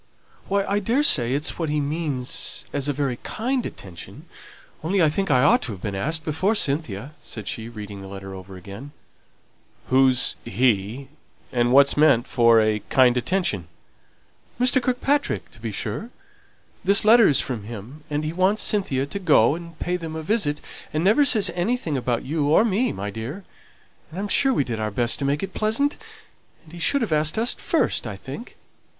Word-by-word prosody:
"Why, 200 0 +1
I 200 +1 0
daresay 195 - +2
it's 150 +5 -2
what 165 -3 -1
he 150 0 0
means 145 -3 -2
as 145 -1 -1
a - - +1
very 135 -3 -2
kind 250 - -2
attention, 90 -4 -11 0.6
only 190 +5 0
I 160 -3 +5
think 195 +4 -2
I 130 -2 +4
ought 145 - +5
to 115 - -2
have 95 - -11
been 105 - -3
asked 155 +11 -2
before 165 +8 0
Cynthia," 140 - -2
said 110 -4 -7
she, 115 0 -5
reading 105 -3 -8
the 95 - -9
letter 95 0 -8
over 95 0 -10
again. 100 +10 -10 1.0
"Who's 130 -1 +3
he? 115 +3 0 0.4
and 120 -1 +1
what's 140 +1 +6
meant 145 -6 +4
for 115 -4 +4
a 110 -1 +1
'kind 125 -2 +4
attention'?" 125 - -1 0.9
"Mr. 250 +1 +3
Kirkpatrick, 270 +4 -1
to 115 - -16
be 115 -1 -5
sure. 110 - -4 0.7
This 200 +2 +5
letter 225 0 +7
is 140 - +4
from 115 -6 -3
him; 120 +7 -9
and 150 0 -2
he 155 - -3
wants 190 +4 +2
Cynthia 140 -11 +1
to 170 +8 -5
go 150 - +4
and 170 0 -9
pay 180 0 -2
them 165 -2 -7
a 160 - -5
visit, 155 -6 0 0.3
and 155 +2 -1
never 220 +10 +4
says 210 -8 +4
anything 175 -3 -1
about 125 -2 -1
you 145 +1 -1
or 165 +9 +5
me, 230 +3 +1
my 100 +1 -5
dear. 120 - -6 0.7
And 165 +4 -8
I'm 205 - -2
sure 270 +5 +4
we 190 - +1
did 115 -4 -4
our 110 0 -1
best 120 +3 0
to 140 - -2
make 140 +4 0
it 195 - -5
pleasant; 225 +7 0 0.7
and 160 - -18
he 175 - -9
should 265 - +2
have 220 - -3
asked 150 +4 +1
us 230 +2 +2
first, - - -1
I - - -5
think." - - -9
145 Hz, 185 wpm, -23 LUFS, 120-195 Hz, 1.0 s, letter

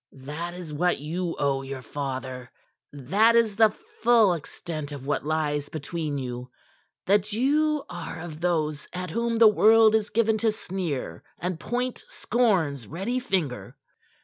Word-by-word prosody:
"That 170 +5 -5
is 175 -4 -7
what 175 +4 +1
you 165 +4 -3
owe 140 -1 +1
your 135 -1 -7
father; 130 -1 -5 0.4
that 195 - +3
is 225 -3 +3
the 220 0 +6 0.3
full 230 -5 +5
extent 155 -2 -6
of 140 -2 -7
what 145 - -1
lies 150 -2 -1
between 155 -1 -4
you 125 -1 -5 0.6
that 205 +1 +2
you 295 +5 +2
are 175 -2 -7
of 160 -1 -8
those 155 -4 0
at 180 -2 -4
whom 235 +4 0
the 225 -1 +7
world 220 +1 +6
is 220 -1 +1
given 220 0 +2
to 225 0 +2
sneer 180 -9 -4 0.2
and 180 -2 -3
point 245 +4 -3
scorn's 170 - 0
ready 195 - -2
finger." 155 - -2
175 Hz, 150 wpm, -26 LUFS, 145-220 Hz, 0.6 s, the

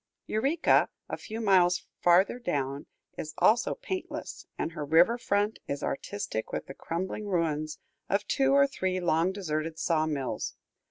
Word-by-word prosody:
Eureka, 270 +10 +3 0.2
a - - -2
few 220 0 -7
miles 185 -5 +3
farther 180 +7 +4
down, 140 - -2 0.3
is 155 0 -5
also 235 +2 +3
paintless, 395 -7 -5
and - - -2
her 155 -3 -5
river 165 +10 +5
front 205 -2 0
is 140 - -3
artistic 170 - -3
with - - -3
the - - -8
crumbling 185 +8 -4
ruins 155 -4 -1 0.3
of 200 +1 +1
two 270 +5 +2
or 280 0 +6
three 185 -9 -1
long 170 0 +2
deserted 160 -4 -3
saw 160 -2 +1
mills. 140 -4 -3
180 Hz, 150 wpm, -29 LUFS, 155-215 Hz, 0.3 s, or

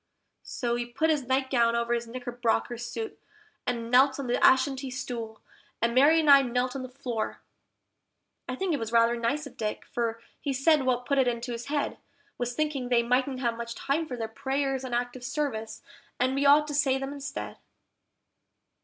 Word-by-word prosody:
So 240 -2 -3
he 240 0 -3
put 275 +7 +1
his 285 -5 -1
nightgown 260 -3 +2
over 235 0 0
his 235 0 -2
knickerbocker 245 -1 -1
suit, 240 - -6 0.5
and 230 -1 -2
knelt 265 +2 +5
on 275 - -3
the 245 0 0
Ashantee 265 0 +4
stool, 240 -5 -5 0.4
and 230 +1 +1
Mary 290 +6 +6
and 315 - 0
I 280 -1 +9
knelt 250 0 -1
on 270 - -3
the 255 - -6
floor. 245 -4 -4 1.1
I 255 - -2
think 360 +5 -1
it 290 - 0
was 225 -1 -4
rather 230 0 +4
nice 240 +6 -1
of 280 - -12
Dick, 215 -1 -3
for 230 -1 -2 0.2
he 280 - -2
said 275 +1 +3
what 250 -1 +1
put 280 +1 +1
it 260 - +3
into 240 +1 -2
his 235 +2 -5
head 290 0 -2 0.4
Was 245 0 -2
thinking 295 -5 -1
they 240 -1 +4
mightn't 255 +2 0
have 235 -2 0
much 235 0 -6
time 310 +4 -1
for 250 - -5
their 225 -1 -3
prayers 270 +2 -2
on 250 -2 -3
active 245 +1 -3
service, 245 -6 -3 0.4
and 255 +1 +2
we 280 +1 +2
ought 295 +1 +6
to - - -4
say 280 -2 +2
them 270 +1 -4
instead. 280 0 -6
255 Hz, 190 wpm, -28 LUFS, 235-275 Hz, 1.1 s, I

